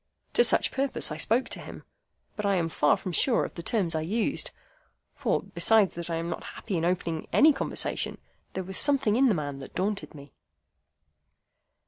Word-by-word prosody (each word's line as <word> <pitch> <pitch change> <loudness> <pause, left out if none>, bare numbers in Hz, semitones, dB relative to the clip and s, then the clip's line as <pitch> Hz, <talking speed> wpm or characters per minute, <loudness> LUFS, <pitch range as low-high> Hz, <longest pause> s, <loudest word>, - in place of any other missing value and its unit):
To 475 - +5
such - - +3
purpose 270 - 0
I 150 - -4
spoke 230 +10 +1
to - - -4
him; - - -10 0.5
but 210 - -5
I 200 -1 +2
am 170 -2 0
far 150 -2 +2
from 185 - -6
sure 235 - +3
of - - -8
the 170 - -7
terms 185 -2 0
I 160 - -1
used; 220 - 0 0.6
for, - - -1
besides 220 -4 +2
that 170 0 -6
I 165 - -1
am 165 +1 -3
not - - -5
happy 195 - -5
in 165 - -1
opening 170 -2 -2
any 305 +1 +6
conversation, - - -1 0.4
there 190 - -3
was 190 +1 0
something 275 -7 +3
in 265 +3 +4
the 220 - +3
man 145 -3 -4
that 135 - -11
daunted 195 -2 -2
me. 140 -2 -13
185 Hz, 190 wpm, -27 LUFS, 165-225 Hz, 0.6 s, any